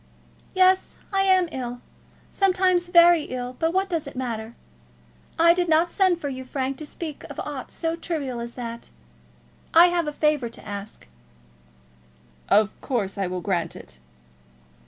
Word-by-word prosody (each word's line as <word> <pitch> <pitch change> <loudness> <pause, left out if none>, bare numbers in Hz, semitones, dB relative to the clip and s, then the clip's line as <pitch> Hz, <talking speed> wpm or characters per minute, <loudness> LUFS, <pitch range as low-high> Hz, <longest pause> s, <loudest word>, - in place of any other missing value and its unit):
"Yes, 370 0 +3 0.2
I 390 - +3
am 375 -2 +4
ill; 245 -3 -5 0.5
sometimes 370 -2 +2
very 345 -3 +6
ill; 250 0 -5
but 325 0 +1
what 380 +2 +1
does 335 -5 -3
it - - -9
matter? 235 -3 -4 0.8
I 335 +1 +6
did 355 -1 -1
not 330 +2 +3
send 375 -4 +2
for 290 - -4
you, 260 -2 -5
Frank, 265 +1 -3
to 305 - -7
speak 310 -1 -7
of - - -9
aught 285 -4 -6
so 330 -1 -2
trivial 295 -7 -4
as 235 0 -7
that. 235 -2 -7 0.9
I 345 +2 +9
have 345 -2 0
a - - -1
favour 295 -5 +1
to 230 - -11
ask." 200 - -8 1.4
"Of 210 0 +4
course 210 -7 -2
I 195 - 0
will 180 0 -4
grant 170 -4 -1
it." 60 -1 -11
295 Hz, 155 wpm, -24 LUFS, 235-345 Hz, 1.4 s, I